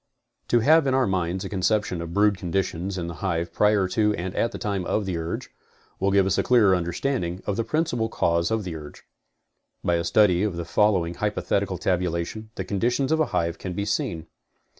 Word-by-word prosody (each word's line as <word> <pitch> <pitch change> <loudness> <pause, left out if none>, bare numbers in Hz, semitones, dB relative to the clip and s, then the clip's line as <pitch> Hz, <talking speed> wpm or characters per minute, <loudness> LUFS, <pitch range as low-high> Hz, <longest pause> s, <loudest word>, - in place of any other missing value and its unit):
To 120 - +3
have 155 +3 +5
in 130 - +2
our 130 -1 +3
minds 95 0 -1
a - - -5
conception 95 -2 0
of 85 0 -6
brood 100 +2 +3
conditions 95 0 -2
in 85 - -3
the 85 - -5
hive 85 -3 -2
prior 105 -1 +3
to 105 +1 +2
and 90 +2 -4
at 115 - +1
the - - -6
time 100 -4 -2
of 105 +3 0
the 95 -2 -2
urge, 80 0 -4 0.5
will 95 - +2
give 100 -1 +4
us 95 - +1
a - - +4
clearer 110 -7 +4
understanding 90 +1 -2
of 100 - -1
the 115 - 0
principal 120 -6 -1
cause 85 -4 +1
of 110 -1 0
the 90 -3 -5
urge. 75 -2 -10 0.8
By.a 85 -1 +1
study 95 -2 +4
of 105 -4 0
the 85 0 -4
following 90 -2 +2
hypothetical 100 -1 -1
tabulation, 90 +4 -2
the - - -4
conditions 120 +7 0
of 160 - +2
a 155 - +2
hive 85 -8 -1
can 95 - -5
be 100 +3 -2
seen. 85 -5 -2
95 Hz, 205 wpm, -25 LUFS, 85-110 Hz, 0.8 s, have